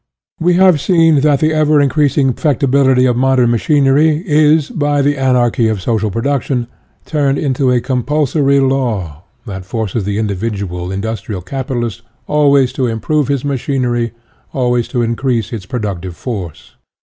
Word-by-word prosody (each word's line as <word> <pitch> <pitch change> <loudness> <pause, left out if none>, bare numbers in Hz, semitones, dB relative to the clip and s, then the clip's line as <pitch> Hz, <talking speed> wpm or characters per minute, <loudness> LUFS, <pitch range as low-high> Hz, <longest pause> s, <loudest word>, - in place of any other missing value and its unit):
We 175 +1 +2
have 180 -5 +4
seen 165 -3 +3
that 145 -1 +2
the 155 0 +2
ever 155 -1 +3
increasing 140 -1 +2
perfectibility 135 -2 +2
of 125 -2 +2
modern 130 -1 +2
machinery 150 +5 +2
is, 150 -2 +3
by 145 -1 0
the 145 +1 +1
anarchy 125 -3 +1
of 110 -2 -1
social 110 +2 -1
production, 125 +3 -1 0.4
turned 140 -3 0
into 135 -2 0
a 125 -1 +2
compulsory 140 +2 +1
law 110 - -1 0.2
that 95 -4 -7
forces 110 +1 -3
the 100 +1 -3
in 110 - 0
dividual 100 -3 -4
industrial 100 -1 -4
capitalist 120 0 -4 0.2
always 140 -3 +2
to 130 -2 -1
im 115 0 -3
prove 150 +5 0
his 140 -1 -1
machinery 125 -4 -1 0.4
always 125 -2 0
to 120 -2 -1
increase 115 -1 -1
its 100 -5 -6
productive 95 -7 -4
force. 95 - -7
130 Hz, 150 wpm, -15 LUFS, 115-145 Hz, 0.4 s, have